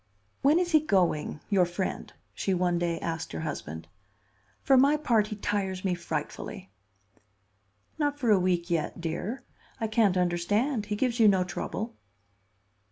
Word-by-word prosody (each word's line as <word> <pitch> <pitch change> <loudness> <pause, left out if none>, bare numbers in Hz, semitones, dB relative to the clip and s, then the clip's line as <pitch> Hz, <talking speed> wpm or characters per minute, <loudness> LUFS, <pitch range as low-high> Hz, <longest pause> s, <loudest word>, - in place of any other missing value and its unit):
"When 290 +4 +5
is 350 0 0
he 310 - +6
going—your 185 - +1
friend?" 175 +2 -4 0.2
she 195 - -1
one 175 -1 +1
day 170 -1 -1
asked 165 -1 -4
her - - -4
husband. 80 - -5 0.8
"For 270 - +5
my 280 +3 +5
part, 230 -8 +2
he 215 - -5
tires 200 -2 -2
me 185 - +2
frightfully." 170 +3 -5 1.3
"Not 290 -1 0
for 245 -6 +1
a 200 - +5
week 180 -1 0
yet, 165 0 -1
dear. 180 +10 -4 0.4
I 225 - -1
can't 215 -4 +2
understand; 205 +7 0
he 210 - -1
gives 240 +2 0
you 220 - +7
no 190 -2 +4
trouble." 220 +5 -5
195 Hz, 150 wpm, -28 LUFS, 175-230 Hz, 1.3 s, you